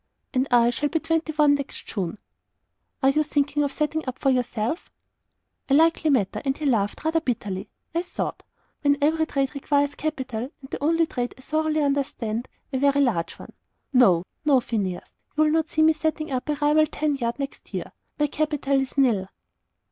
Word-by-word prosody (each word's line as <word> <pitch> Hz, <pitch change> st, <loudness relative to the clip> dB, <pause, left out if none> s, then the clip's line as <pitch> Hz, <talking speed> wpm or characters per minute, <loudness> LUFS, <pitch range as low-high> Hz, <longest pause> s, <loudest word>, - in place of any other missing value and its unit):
"And 260 Hz, 0 st, +1 dB
I 240 Hz, -1 st, +5 dB
shall 290 Hz, +5 st, -1 dB
be 325 Hz, -, 0 dB
twenty 320 Hz, 0 st, 0 dB
one 295 Hz, -1 st, +5 dB
next 280 Hz, -1 st, -4 dB
June." 190 Hz, -2 st, -3 dB, 0.9 s
"Are 270 Hz, -, +6 dB
you 305 Hz, +2 st, +2 dB
thinking 295 Hz, -1 st, 0 dB
of 285 Hz, -1 st, 0 dB
setting 305 Hz, +2 st, -1 dB
up 255 Hz, 0 st, -3 dB
for 270 Hz, -, +2 dB
yourself?" 245 Hz, -, -1 dB, 0.8 s
"A 275 Hz, -, +5 dB
likely 320 Hz, 0 st, +4 dB
matter!" 230 Hz, -10 st, +1 dB
and 270 Hz, -1 st, 0 dB
he 310 Hz, -, -4 dB
laughed, 215 Hz, -5 st, +1 dB
rather 325 Hz, +1 st, +2 dB
bitterly, 205 Hz, -7 st, -3 dB, 0.2 s
I 335 Hz, -, +1 dB
thought 355 Hz, -, -4 dB, 0.4 s
"when 285 Hz, -1 st, +3 dB
every 315 Hz, +2 st, +2 dB
trade 275 Hz, -2 st, -1 dB
requires 285 Hz, 0 st, +1 dB
capital, 260 Hz, -6 st, -3 dB
and 265 Hz, -, -12 dB
the -, -, -4 dB
only 330 Hz, +2 st, +3 dB
trade 245 Hz, -5 st, -3 dB
I -, -, -14 dB
thoroughly 310 Hz, +2 st, 0 dB
understand, 260 Hz, -5 st, -1 dB, 0.3 s
a 260 Hz, -, +1 dB
very 280 Hz, +1 st, +3 dB
large 215 Hz, -11 st, +1 dB
one. -, -, -12 dB, 0.4 s
No, 185 Hz, -9 st, +5 dB, 0.2 s
no, 285 Hz, -4 st, +5 dB
Phineas; 200 Hz, -7 st, -4 dB, 0.2 s
you'll 310 Hz, 0 st, +4 dB
not 320 Hz, 0 st, +1 dB
see 315 Hz, -2 st, +2 dB
me 320 Hz, 0 st, +6 dB
setting 310 Hz, -1 st, -2 dB
up 255 Hz, +2 st, -2 dB
a 300 Hz, -, +2 dB
rival 300 Hz, +1 st, +3 dB
tan 300 Hz, -1 st, -1 dB
yard 235 Hz, -2 st, -2 dB
next 275 Hz, -1 st, -6 dB
year. -, -, -4 dB, 0.3 s
My 295 Hz, -, +3 dB
capital 290 Hz, -2 st, 0 dB
is 270 Hz, +1 st, -6 dB
NIL." 225 Hz, -9 st, +3 dB
280 Hz, 185 wpm, -25 LUFS, 250-310 Hz, 0.9 s, Are